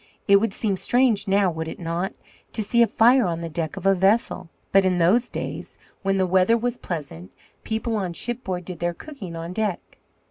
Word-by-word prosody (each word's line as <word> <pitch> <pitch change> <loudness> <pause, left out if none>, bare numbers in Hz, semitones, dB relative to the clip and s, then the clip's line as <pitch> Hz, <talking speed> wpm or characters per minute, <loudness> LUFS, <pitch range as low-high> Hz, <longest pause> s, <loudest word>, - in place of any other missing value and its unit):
It 200 -1 +7
would 220 +1 0
seem 195 -1 -1
strange 225 +1 +2
now, 195 -1 +3
would 160 0 -4
it - - -6
not, 170 +2 -3 0.4
to 220 - 0
see 235 +3 +2
a 235 - +6
fire 240 +2 +4
on 170 -1 -2
the 165 - -4
deck 165 +3 -4
of 195 - -7
a 195 - +6
vessel? 190 -1 +1 0.2
But 195 0 +5
in 185 -1 +2
those 195 +9 +3
days, - - -6 0.2
when 195 0 +1
the 190 - +2
weather 185 +5 +3
was 245 +1 -2
pleasant, 140 - -6 0.3
people 220 +1 -2
on 185 -4 -2
shipboard 190 -3 -4
did 180 -2 -7
their 175 0 -1
cooking 230 - -9
on 165 +2 -6
deck. 210 -3 -3
195 Hz, 205 wpm, -24 LUFS, 175-220 Hz, 0.4 s, It